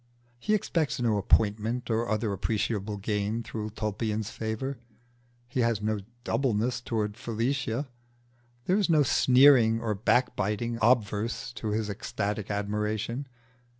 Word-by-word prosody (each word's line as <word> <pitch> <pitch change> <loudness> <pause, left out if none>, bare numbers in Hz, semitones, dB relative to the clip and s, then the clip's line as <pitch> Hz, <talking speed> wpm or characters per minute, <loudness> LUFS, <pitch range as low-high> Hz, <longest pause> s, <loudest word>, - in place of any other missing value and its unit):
He 210 - +1
expects 165 -9 -1
no 115 -4 +2
appointment 110 +4 +1
or 115 0 0
other 110 -1 0
appreciable 105 +1 -1
gain 105 +2 -1
through 110 -2 -5
Tulpian's 110 0 -2
favour; 115 +4 -4 0.7
he 130 +1 -3
has 115 -3 +2
no 105 0 -1 0.2
doubleness 120 -2 0
towards 105 -4 -2
Felicia; 120 +3 -1 0.8
there 185 +3 +3
is 195 - +1
no 155 -3 +5
sneering 125 -4 +5
or 110 -2 -1
backbiting 115 +1 0
obverse 115 +1 +1
to 115 - -5
his 105 0 -1
ecstatic 105 0 -3
admiration. 105 +5 -2
110 Hz, 120 wpm, -28 LUFS, 105-120 Hz, 0.8 s, no